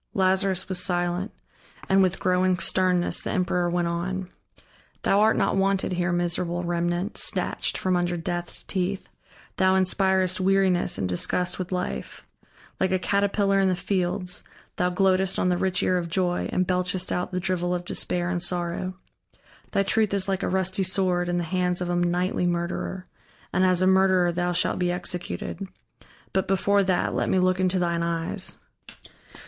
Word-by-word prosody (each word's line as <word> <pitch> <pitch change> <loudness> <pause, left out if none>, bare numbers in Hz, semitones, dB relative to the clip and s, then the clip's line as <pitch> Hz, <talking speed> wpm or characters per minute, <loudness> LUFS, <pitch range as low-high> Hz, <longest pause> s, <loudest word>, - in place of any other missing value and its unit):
Lazarus 190 0 +1
was 185 -1 -1
silent, 175 +3 -1 0.6
and 195 0 +4
with 185 0 +1
growing 185 0 +2
sternness 180 -1 +1
the - - -5
emperor 180 -2 0
went 175 0 0
on: 180 +2 -3 0.7
"Thou 200 - +3
art 220 +1 +4
not - - +1
wanted 195 -1 +1
here, 175 0 0
miserable 175 0 0
remnant, 175 +3 -2
snatched - - 0
from 185 -1 0
under 175 0 0
Death's 175 +1 -3
teeth, 190 +1 -2 0.5
thou 190 -1 +4
inspirest 190 -1 +1
weariness 185 -2 +2
and 95 - -1
disgust 175 - -1
with 185 0 -4
life; 180 0 -4 0.5
like 190 - +2
a 190 - +3
caterpillar 200 +1 +1
in 190 -1 +3
the 185 - +1
fields, 180 -1 -2 0.3
thou 180 - +2
gloatest 190 +1 +2
on 180 - +1
the 180 - +2
rich 190 0 0
ear 180 -1 +2
of 170 -1 -5
joy 180 0 0
and 185 - +1
belchest 180 0 -1
out 180 +1 -2
the 180 - -1
drivel 180 -1 -1
of 175 0 -5
despair 175 0 -2
and 175 -1 -1
sorrow. 180 +1 -2 0.8
Thy 195 - +2
truth 215 0 +2
is 195 -1 +2
like 195 -1 -1
a - - -1
rusty 190 +1 0
sword 180 -2 +1
in 175 - 0
the 175 - 0
hands 180 +1 0
of 175 -1 -2
a - - 0
nightly 175 +1 0
murderer, 175 +2 -3 0.5
and 185 - +2
as 185 -1 +3
a - - +4
murderer 190 -2 +4
thou 175 +1 -1
shalt 175 - +1
be 180 -1 +1
executed. 180 +2 -4 0.7
But 190 -1 0
before 200 +1 +2
that, 185 -2 +1
let - - 0
me - - +2
look 185 0 +2
into 185 0 +2
thine 170 -1 0
eyes. 170 -1 -1
180 Hz, 170 wpm, -25 LUFS, 175-190 Hz, 0.8 s, and